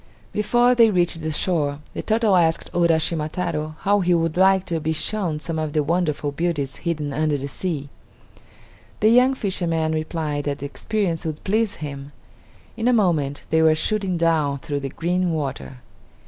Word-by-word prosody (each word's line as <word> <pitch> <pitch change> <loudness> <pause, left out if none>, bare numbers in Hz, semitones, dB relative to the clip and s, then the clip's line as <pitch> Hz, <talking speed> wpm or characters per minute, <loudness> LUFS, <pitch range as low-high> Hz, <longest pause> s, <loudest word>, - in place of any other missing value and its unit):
Before 240 +4 +3
they 230 -2 +6
reached 175 -4 +1
the 155 0 -2
shore, 150 -3 0 0.2
the - - -4
turtle 220 -2 +2
asked 165 -2 +1
Uraschima 165 -2 +1
Taro 155 -4 -3
how 205 +1 +3
he 180 -2 +2
would 165 -1 0
like 190 +1 +4
to 165 -1 -2
be 160 +1 -1
shown 170 -2 -1
some 160 +1 -4
of 155 -2 -3
the 150 - +2
wonderful 150 -2 0
beauties 145 -3 -2
hidden 155 -4 -3
under 155 0 +1
the 140 0 -5
sea. 145 -1 -4 1.1
The 215 - +4
young 250 +3 +5
fisherman 170 -7 -1
replied 155 -2 -2
that 145 -1 -1
the 140 - -6
experience 175 +2 -2
would 155 -3 -5
please 215 +1 0
him. 140 -1 -7 0.6
In 230 0 -1
a 250 - +4
moment 160 - +1
they 160 0 +4
were 160 -1 +5
shooting 190 +2 -1
down 160 -4 +1
through 145 +1 -4
the 140 -1 -4
green 175 +4 -1
water. 135 -4 -4
165 Hz, 175 wpm, -22 LUFS, 150-185 Hz, 1.1 s, they